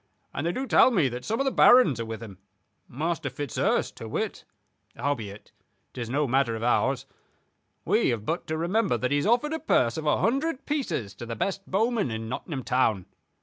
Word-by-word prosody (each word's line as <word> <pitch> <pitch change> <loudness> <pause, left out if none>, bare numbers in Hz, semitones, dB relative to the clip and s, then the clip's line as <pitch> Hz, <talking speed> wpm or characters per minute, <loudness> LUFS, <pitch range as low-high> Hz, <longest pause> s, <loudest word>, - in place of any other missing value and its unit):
And 160 - -2
they - - +1
do 260 +9 -3
tell 260 - +6
me 175 - +2
that 125 +1 -6
some 225 - -2
of 275 - +1
the 270 - +1
barons 245 - +6
are 115 - -2
with 110 0 -6
him, 100 -4 -11 0.5
Master 160 +2 -2
Fitzurse 145 -1 -1
to - - -9
wit. - - -3 0.5
Howbeit, 110 -8 -4 0.4
'tis 120 -2 -5
no 145 +3 +1
matter 130 -2 +1
of 110 - -5
ours. 130 +2 +1 0.8
We - - +2
have 110 -3 -2
but 165 +7 -2
to 155 - -2
remember 180 - +1
that 125 +3 -2
he 145 - +3
has 145 - 0
offered 275 +7 +2
a 320 - -2
purse 120 - +2
of 155 -1 -4
a 150 - +3
hundred 275 +5 0
pieces 170 - -2
to 120 - -7
the 115 - -4
best 195 - -3
bowman 220 - +1
in 110 0 -4
Nottingham 130 +3 -5
town. 110 -7 +1
145 Hz, 200 wpm, -26 LUFS, -, 0.8 s, tell